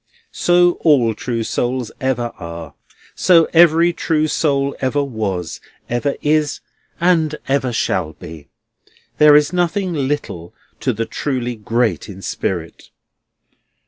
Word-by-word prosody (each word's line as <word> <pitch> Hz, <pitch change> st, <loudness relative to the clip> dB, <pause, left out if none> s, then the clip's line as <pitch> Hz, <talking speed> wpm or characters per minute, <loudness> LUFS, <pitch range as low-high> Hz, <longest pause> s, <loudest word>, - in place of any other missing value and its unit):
So 175 Hz, 0 st, +3 dB
all 130 Hz, -8 st, +4 dB
true 115 Hz, +1 st, -3 dB
souls 120 Hz, +1 st, -2 dB
ever 120 Hz, -3 st, -1 dB
are. 85 Hz, -3 st, -8 dB, 0.4 s
So 170 Hz, -3 st, +4 dB
every 170 Hz, +1 st, +5 dB
true 155 Hz, -2 st, 0 dB
soul 140 Hz, -3 st, 0 dB
ever 140 Hz, +2 st, 0 dB
was, 105 Hz, -, -4 dB, 0.3 s
ever 130 Hz, +4 st, 0 dB
is, 150 Hz, -1 st, +1 dB, 0.4 s
and 165 Hz, -3 st, +2 dB
ever 135 Hz, -2 st, 0 dB, 0.2 s
will -, -, -2 dB
be. 80 Hz, -3 st, -11 dB, 0.7 s
There 150 Hz, -1 st, +7 dB
is 150 Hz, +3 st, +3 dB
nothing 180 Hz, +1 st, 0 dB
little 135 Hz, -, -3 dB, 0.2 s
to -, -, 0 dB
the 115 Hz, +2 st, -3 dB, 0.2 s
really 125 Hz, -3 st, -1 dB
great 110 Hz, -5 st, -1 dB
in 95 Hz, -1 st, -10 dB
spirit. 85 Hz, -3 st, -4 dB
135 Hz, 120 wpm, -18 LUFS, 115-155 Hz, 0.7 s, There